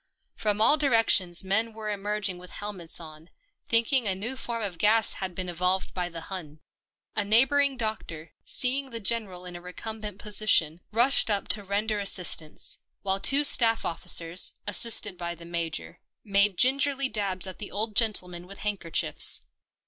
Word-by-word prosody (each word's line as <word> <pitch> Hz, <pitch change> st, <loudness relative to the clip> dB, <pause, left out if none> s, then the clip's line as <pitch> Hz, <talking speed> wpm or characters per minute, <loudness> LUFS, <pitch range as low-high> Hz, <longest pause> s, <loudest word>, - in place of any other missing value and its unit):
From 210 Hz, -1 st, -2 dB
all 295 Hz, +7 st, +5 dB
directions 225 Hz, -, +2 dB
men 220 Hz, +4 st, 0 dB
were 215 Hz, -1 st, -8 dB
emerging 205 Hz, -2 st, -3 dB
with 180 Hz, 0 st, -13 dB
helmets 195 Hz, -5 st, -1 dB
on, 160 Hz, 0 st, -14 dB, 0.4 s
thinking 235 Hz, +1 st, +3 dB
a 190 Hz, -, +2 dB
new 225 Hz, +7 st, -3 dB
form 230 Hz, -2 st, -5 dB
of 180 Hz, -5 st, -6 dB
gas 220 Hz, +1 st, +3 dB
had 185 Hz, -2 st, -7 dB
been 185 Hz, 0 st, -4 dB
evolved 180 Hz, +2 st, -2 dB
by 180 Hz, -1 st, -4 dB
the 165 Hz, -1 st, -9 dB
Hun. 160 Hz, -5 st, -9 dB, 0.6 s
A 205 Hz, -, 0 dB
neighbour 240 Hz, +8 st, +3 dB
ing 280 Hz, -2 st, +2 dB
doctor, 215 Hz, -8 st, -5 dB
seeing 265 Hz, +2 st, +1 dB
the 230 Hz, -2 st, -5 dB
General 200 Hz, -4 st, -2 dB
in 180 Hz, -1 st, -9 dB
a 175 Hz, -, -10 dB
recumbent 210 Hz, +3 st, -7 dB
position, 200 Hz, -6 st, +1 dB
rushed 240 Hz, +3 st, +4 dB
up 205 Hz, -2 st, 0 dB
to 205 Hz, -, 0 dB
render 205 Hz, +2 st, -3 dB
assistance, 180 Hz, -5 st, +2 dB, 0.2 s
while 195 Hz, 0 st, -1 dB
two 275 Hz, +8 st, +3 dB
staff 230 Hz, -5 st, +4 dB
officers, 165 Hz, +1 st, +3 dB
assisted 205 Hz, -3 st, 0 dB
by 170 Hz, 0 st, -5 dB
the 170 Hz, 0 st, -13 dB
Major, 170 Hz, -2 st, -5 dB, 0.2 s
made 200 Hz, -2 st, +1 dB
gingerly 275 Hz, +1 st, +2 dB
dabs 200 Hz, -5 st, 0 dB
at 185 Hz, -1 st, -8 dB
the 210 Hz, -, -8 dB
old 215 Hz, +1 st, -4 dB
gentleman 180 Hz, -6 st, 0 dB
with 200 Hz, +1 st, -10 dB
handkerchiefs. 200 Hz, -6 st, 0 dB
205 Hz, 165 wpm, -25 LUFS, 180-225 Hz, 0.6 s, all